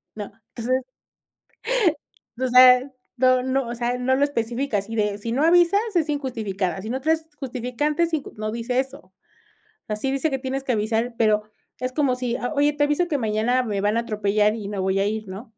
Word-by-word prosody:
¿no? 210 Hz, -2 st, -6 dB, 0.2 s
Entonces, 255 Hz, +3 st, 0 dB, 2.4 s
no 255 Hz, 0 st, +4 dB
no, 260 Hz, 0 st, 0 dB
o 235 Hz, -, -4 dB
sea, 240 Hz, +1 st, -1 dB
no 260 Hz, +1 st, +2 dB
lo 275 Hz, -, +2 dB
especifica, 240 Hz, -3 st, -1 dB
así 210 Hz, +3 st, -7 dB
de: 210 Hz, -2 st, 0 dB
"Si 230 Hz, +2 st, -4 dB
no 265 Hz, +5 st, +1 dB
avisas, 350 Hz, +4 st, +5 dB, 0.2 s
es 320 Hz, -3 st, +2 dB
injustificada. 210 Hz, -, -2 dB
Si 220 Hz, -, -7 dB
no 260 Hz, +3 st, -2 dB
traes 320 Hz, +2 st, 0 dB
justificante, 265 Hz, +4 st, -2 dB
es 335 Hz, 0 st, -1 dB
inj". 305 Hz, -3 st, -1 dB
No 215 Hz, 0 st, -3 dB
dice 235 Hz, +2 st, -1 dB
eso. 260 Hz, -8 st, -5 dB, 0.7 s
Ah, 210 Hz, -, -2 dB
sí 265 Hz, +6 st, -2 dB
dice 275 Hz, +4 st, 0 dB
que 270 Hz, -2 st, -2 dB
tienes 265 Hz, +1 st, -3 dB
que 255 Hz, -, +1 dB
avisar, 225 Hz, +2 st, -1 dB
pero 215 Hz, -2 st, +3 dB, 0.4 s
es 255 Hz, 0 st, -3 dB
como 275 Hz, -4 st, +1 dB
si: 250 Hz, -1 st, -2 dB
"Ah, 245 Hz, -, -3 dB
oye, 290 Hz, +1 st, +3 dB
te 290 Hz, 0 st, +1 dB
aviso 295 Hz, +5 st, +1 dB
que 305 Hz, -4 st, 0 dB
mañana 225 Hz, +2 st, +1 dB
me 210 Hz, -4 st, -2 dB
van 210 Hz, +1 st, +1 dB
a -, -, +2 dB
atropellar, 210 Hz, -1 st, +1 dB
y 210 Hz, -3 st, -6 dB
me 205 Hz, -1 st, -4 dB
voy 190 Hz, +1 st, +1 dB
a 195 Hz, -, +2 dB
ir", 215 Hz, 0 st, -3 dB
¿no? 220 Hz, +5 st, -9 dB
245 Hz, 200 wpm, -23 LUFS, 215-270 Hz, 2.4 s, avisas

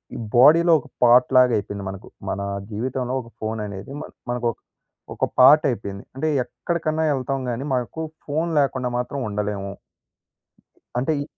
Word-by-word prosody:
ఈ -, -, -4 dB, 0.2 s
బోడీలో 165 Hz, +7 st, +7 dB
ఒక -, -, -14 dB, 0.2 s
పార్ట్‌లాగా 125 Hz, +1 st, +6 dB
అయిపోయింది 100 Hz, -1 st, -5 dB
మనకు. 95 Hz, -1 st, -9 dB, 0.2 s
మన 100 Hz, -, -2 dB, 0.3 s
జీవితంలో 125 Hz, +3 st, -2 dB
ఒక 115 Hz, -1 st, -15 dB
ఫోననేది 105 Hz, -1 st, -5 dB
మన -, -, -8 dB, 0.2 s
మనకొక 120 Hz, -2 st, -1 dB, 0.6 s
ఒక -, -, +1 dB
పార్ట్ 145 Hz, +4 st, +8 dB
అయిపోయింది. 100 Hz, -3 st, -6 dB
అంటే 135 Hz, +4 st, -1 dB, 0.2 s
ఎక్కడికన్నా 160 Hz, +2 st, -2 dB
వెళ్తాం 135 Hz, 0 st, -2 dB
గానీ 120 Hz, +3 st, -3 dB
మాకు 125 Hz, +5 st, -2 dB, 0.3 s
ఫోను 160 Hz, +4 st, -1 dB
లేకుండా 130 Hz, -3 st, 0 dB
మాత్రం 125 Hz, +3 st, -3 dB
ఉండలేము. 100 Hz, -1 st, -3 dB, 1.3 s
అంటే 135 Hz, +6 st, +1 dB
ఈ -, -, -5 dB
125 Hz, 135 wpm, -23 LUFS, 105-140 Hz, 1.3 s, పార్ట్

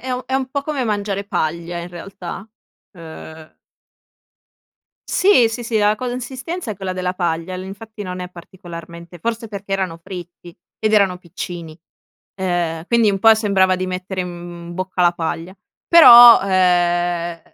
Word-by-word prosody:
è 255 Hz, 0 st, -4 dB
un 250 Hz, -, -3 dB
è 265 Hz, -, -3 dB
un 265 Hz, -1 st, -1 dB
po' 280 Hz, +1 st, -2 dB
come 285 Hz, -4 st, -3 dB
mangiare 205 Hz, -2 st, -2 dB
paglia 170 Hz, -1 st, -3 dB
in 170 Hz, -, -6 dB
realtà, 180 Hz, +2 st, -9 dB, 0.4 s
uhm 160 Hz, -2 st, -12 dB, 1.5 s
Sì, 370 Hz, -, +4 dB
sì, 230 Hz, +2 st, -5 dB
sì, 230 Hz, -1 st, -2 dB
la 210 Hz, +1 st, +2 dB
consistenza 255 Hz, -, -5 dB
è 210 Hz, -, -5 dB
quella 190 Hz, -1 st, -4 dB
della 185 Hz, 0 st, -3 dB
paglia, 170 Hz, 0 st, -2 dB
infatti 205 Hz, +3 st, -9 dB
non 180 Hz, -1 st, -6 dB
è 180 Hz, -, -6 dB
particolarmente 170 Hz, -1 st, -11 dB
forse 230 Hz, +4 st, -4 dB
perché 200 Hz, -1 st, -7 dB
erano 190 Hz, -4 st, -2 dB
fritti 175 Hz, -2 st, -10 dB, 0.2 s
ed 215 Hz, 0 st, 0 dB
erano 195 Hz, -4 st, +3 dB
piccini. 170 Hz, -2 st, -8 dB, 0.6 s
Uhm, 175 Hz, -3 st, -2 dB
quindi 230 Hz, -2 st, +3 dB
un 195 Hz, -, -2 dB
po' 225 Hz, +2 st, +6 dB
sembrava 195 Hz, -4 st, +2 dB
di 185 Hz, 0 st, -3 dB
mettere, 185 Hz, 0 st, -4 dB
mhmm, 175 Hz, -1 st, -9 dB
in 175 Hz, -, -8 dB
bocca 185 Hz, 0 st, -2 dB
la 175 Hz, 0 st, +4 dB
paglia. 170 Hz, +2 st, -5 dB, 0.3 s
Però, 240 Hz, -8 st, +10 dB
uhm, 175 Hz, -2 st, +1 dB
185 Hz, 155 wpm, -19 LUFS, 175-215 Hz, 1.5 s, Però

